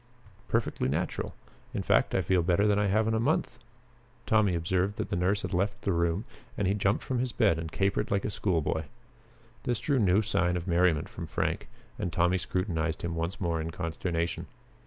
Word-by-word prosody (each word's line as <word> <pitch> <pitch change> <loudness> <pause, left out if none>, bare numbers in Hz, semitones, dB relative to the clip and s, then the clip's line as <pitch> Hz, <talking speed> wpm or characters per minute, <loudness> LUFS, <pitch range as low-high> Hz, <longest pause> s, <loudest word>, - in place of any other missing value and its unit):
"Perfectly 65 - 0
natural. 85 +6 -2 0.4
In - - -1
fact - - +3
I - - +2
feel 95 -2 +3
better 90 +4 +2
than 105 -1 +3
I 105 - +2
have 110 +3 +2
in 110 - +1
a 110 - +2
month." 140 +8 0 0.7
Tommy 105 -5 +3
observed 90 +4 0
that - - -3
the - - +1
nurse 90 +4 +1
had - - -4
left 100 +3 0
the 100 - +1
room 85 +5 +1 0.3
and 100 - +1
he 100 - +3
jumped 100 0 +1
from 130 -2 -1
his 125 0 -1
bed 100 -10 +3
and 80 0 -5
capered 95 +2 0
like 100 -1 0
a - - -1
school 90 -4 0
boy. 80 +1 -1 0.8
This 120 -3 -1
drew 135 +3 +1
no 100 -1 +4
sign 90 -5 +1
of 85 +1 -5
merriment 85 -3 +3
from - - -7
Frank, - - -1 0.3
and 90 - -2
Tommy 90 +3 +2
scrutinized 85 -1 -2
him 85 -1 -2
once 85 +3 -3
more 85 -3 0
in 80 - -3
consternation. 85 0 -2
90 Hz, 200 wpm, -29 LUFS, 85-100 Hz, 0.8 s, no